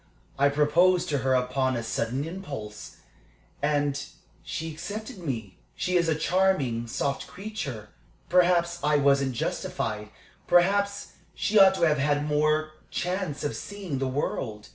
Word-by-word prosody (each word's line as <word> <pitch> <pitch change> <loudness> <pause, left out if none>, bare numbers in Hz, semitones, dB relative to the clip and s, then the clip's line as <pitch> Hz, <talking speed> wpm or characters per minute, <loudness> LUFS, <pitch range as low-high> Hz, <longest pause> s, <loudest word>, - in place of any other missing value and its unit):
I 140 +1 +5
proposed 170 +5 +3
to 145 -2 +1
her 130 +1 +2
upon 130 +1 +1
a 115 - -2
sudden 120 +5 -2
impulse, 145 - -7 0.7
and 145 -1 +1 0.4
she 160 0 -5
accepted 205 - -6
me. 115 - -5 0.2
She 180 - -1
is 170 -2 +3
a 160 - +2
charming, 155 -10 +1
soft 140 +4 -2
creature. 175 - -6 0.4
Perhaps 175 -1 +3
I 150 0 +3
wasn't 140 -2 +3
justified. 105 -2 -3 0.4
Perhaps 200 +3 +2 0.2
she 215 0 +2
ought 190 -1 +7
to 175 - -1
have 150 -3 +4
had 145 +1 +1
more 155 +1 +1 0.2
chance 180 -5 -2
of 145 - -2
seeing 195 -9 -5
the 135 - 0
world. 120 -5 -3
150 Hz, 140 wpm, -27 LUFS, 135-180 Hz, 0.7 s, ought